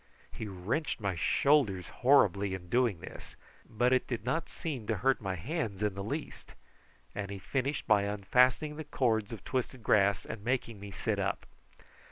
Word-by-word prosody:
He 110 - -6
wrenched 105 - -2
my 100 -3 -1
shoulders 100 - +2
horribly 100 -7 +4
in 90 -1 -10
doing 120 -6 +2
this, - - -10 0.3
but 120 +3 +2
it 130 - +2
did 115 -4 -4
not 160 +6 -1
seem 135 -10 -5
to 110 - +1
hurt 130 +6 +1
my 95 -2 -2
hands 105 - -3
in 105 -2 +1
the 100 +1 -5
least, 145 +9 -6 0.6
and 100 -1 -4
he 100 - -5
finished 135 +8 -2
by 105 -2 +4
unfastening 125 +9 +2
the 155 - -4
cords 115 -8 0
of 115 - -7
twisted 130 -2 -3
grass 100 -2 +3
and 105 - -7
making 115 -3 -1
me 100 0 -8
sit 95 - -2
up. - - -1
110 Hz, 175 wpm, -31 LUFS, 100-130 Hz, 0.6 s, horribly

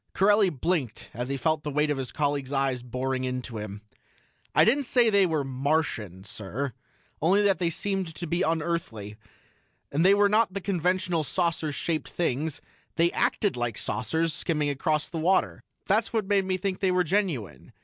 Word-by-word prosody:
Corelli 205 0 +4
blinked 145 - -2
as 125 +2 -4
he 140 - -1
felt 155 +2 +1
the 150 - -4
weight 150 +1 +1
of 145 - -1
his 130 - -4
colleagues' 145 -2 -1
eyes 135 -3 0
boring 130 +1 -2
into 125 -3 -4
him. 105 0 -7 0.7
"I - - +7
didn't 275 +5 +3
say 235 -2 +3
they 200 -2 +5
were 155 -4 0
Martian, 130 - -1
sir 110 +6 -5 0.5
only 190 +7 +4
that 195 -2 +3
they 175 -2 +1
seemed 190 -1 -2
to 175 - -4
be 170 +2 -1
unearthly. 160 - -2 0.8
And 150 +4 +2
they 195 +2 +6
were 205 0 +5
not 210 -1 +2
the - - 0
conventional 180 -2 0
saucer 165 +1 -1
shaped 155 +2 -2
things 155 -2 -2 0.3
they 170 +1 +3
acted 205 -4 +1
like 120 -2 -2
saucers 160 +7 -1
skimming 150 -2 0
across 150 +2 0
the 165 - -5
water. 185 +4 +1 0.2
That's 215 +3 +2
what 220 -3 0
made 195 -1 +2
me 185 0 0
think 185 0 -2
they 190 - +2
were 180 0 +3
genuine. 155 - -2
160 Hz, 180 wpm, -27 LUFS, 135-185 Hz, 0.8 s, I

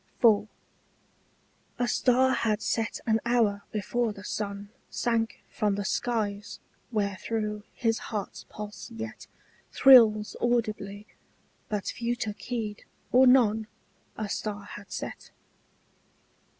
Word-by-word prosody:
IV. 215 -3 +5 1.3
A 245 0 0
star 260 +2 +3
had 215 -4 +1
set 225 -1 -1
an 225 -1 +3
hour 225 -4 +2
before 225 +3 -1
the 200 -1 -10
sun 200 0 -4 0.2
Sank 230 -1 -1
from 205 -2 0
the 200 0 -3
skies 210 -3 -2 0.3
wherethrough 210 0 -2
his 225 -1 +1
heart's 210 -3 -4
pulse 210 +2 -8
yet 225 -1 -7 0.4
Thrills 225 -5 +7
audibly: 215 -4 -1 0.6
but 210 -2 -2
few 235 +1 -2
took 215 -4 -4
heed, 220 -4 -4 0.3
or 255 +1 +7
none, 220 -4 +4 0.5
A 215 - -2
star 205 0 -3
had 205 0 -11
set. - - -6
220 Hz, 110 wpm, -28 LUFS, 205-235 Hz, 1.3 s, Thrills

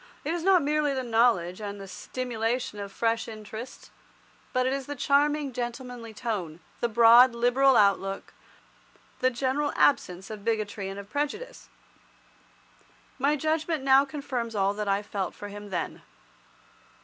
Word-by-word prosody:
It 315 - 0
is 345 - -2
not 365 -2 +4
merely 295 -1 +1
the 260 - -2
knowledge 225 -6 +2
and 205 -1 -5
the 195 - -8
stimulation 235 +1 -3
of 200 -1 -6
fresh 230 +2 0
interests, 220 +2 -9 0.6
but 255 0 +1
it 260 - +1
is 275 -1 -4
the 290 - -4
charming 290 0 +1
gentlemanly 240 -1 -5
tone, 205 -8 -4 0.2
the 235 - 0
broad, 235 +2 +7
liberal 245 +2 +4
outlook, 195 -1 +1 0.9
the 255 - +3
general 265 +4 -1
absence 190 -8 +1
of 210 -2 -8
bigotry 210 -3 -2
and 195 +1 -6
of 200 +1 -11
prejudice. 360 - -4 1.5
My 285 +3 +3
judgment 310 0 -1
now 270 0 +6
confirms 265 -5 -4
all 195 0 +2
that 210 0 -4
I 200 +1 +1
felt 200 -3 -4
for 205 - -8
him 205 0 -9
then. 175 -3 -4
235 Hz, 150 wpm, -27 LUFS, 205-275 Hz, 1.5 s, broad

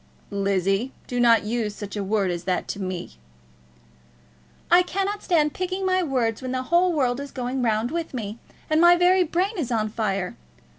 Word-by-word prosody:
"Lizzie, 195 +4 0
do 245 - -3
not 235 -2 +5
use 215 -1 -2
such 205 -1 -7
a 205 - -2
word 195 -2 0
as 175 0 -5
that 185 -1 -1
to 200 - -4
me." 185 - -5 1.5
"I 350 +1 +8
cannot 390 +3 -2
stand 305 -4 +2
picking 370 +1 -3
my 370 0 +2
words 250 -8 -1
when 255 -1 -4
the 255 0 -1
whole 345 +6 +3
world 260 -5 0
is 280 0 -6
going 255 0 -3
round 225 +1 0
with 335 0 -3
me, 220 -3 -5 0.3
and 310 +1 +2
my 345 0 +8
very 360 +1 +4
brain 365 +5 -1
is 260 -6 -2
on 215 -2 0
fire. 195 -4 -2
245 Hz, 185 wpm, -24 LUFS, 210-340 Hz, 1.5 s, I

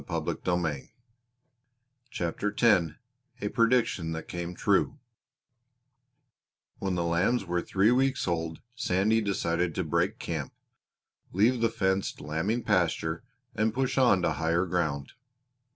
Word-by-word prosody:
CHAPTER 90 +1 -2
X 105 -8 +5 0.5
A 105 - -2
PREDICTION 115 -9 +1
THAT 80 0 -6
CAME 85 0 -5
TRUE - - +1 1.8
When 95 -2 -1
the 85 - 0
lambs 95 +7 +1
were 85 0 -1
three 100 +6 +2
weeks 135 -1 +1
old 80 -2 -2
Sandy 110 -2 +1
decided 90 -4 -1
to - - 0
break - - 0
camp, - - -4 0.8
leave 115 +6 +2
the 115 - +3
fenced 95 -2 -1
lambing 80 +11 -2
pasture, 85 -1 0 0.3
and 110 +1 0
push 130 0 0
on 120 -8 +4
to - - +2
higher 85 +2 +1
ground. 80 -6 -2
95 Hz, 115 wpm, -28 LUFS, 85-110 Hz, 1.8 s, X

